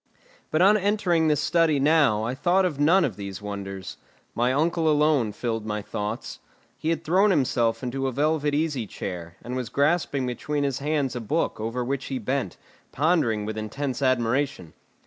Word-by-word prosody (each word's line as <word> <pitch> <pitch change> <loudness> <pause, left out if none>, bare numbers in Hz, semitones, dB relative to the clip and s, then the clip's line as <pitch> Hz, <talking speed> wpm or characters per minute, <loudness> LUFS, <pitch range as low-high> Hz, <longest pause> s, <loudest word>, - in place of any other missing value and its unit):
But 155 +3 +2
on 205 +3 +6
entering 190 -5 +1
this 150 -2 +2
study 165 -4 +2
now 140 -7 +3
I 115 +3 -2
thought 175 +8 +2
of 150 -6 -2
none 170 +6 +4
of 135 - -1
all 100 - -18
these 100 -2 -6
wonders; 100 -2 -6 0.4
my 120 +2 +1
uncle 160 +3 +1
alone 150 -6 +3
filled 115 0 -3
my 105 -1 -3
thoughts. 105 +1 -5 0.4
He 160 - -3
had 165 0 -1
thrown 185 +6 +3
himself 125 - +1
into 135 +2 -2
a - - -1
velvet 145 +2 +1
easy 145 -7 -1
chair, 85 -4 -6
and 125 +2 -5
was 125 -3 -3
grasping 140 -1 +1
between 145 +4 -2
his 140 -3 -1
hands 145 -2 -1
a 120 - -3
book 150 +6 -1
over 115 +3 -2
which 135 +1 -2
he 135 - -3
bent, 130 -3 -2 0.3
pondering 140 -9 +1
with 110 0 -4
intense 130 +6 -4
admiration. 130 - 0
135 Hz, 180 wpm, -25 LUFS, 115-155 Hz, 0.4 s, on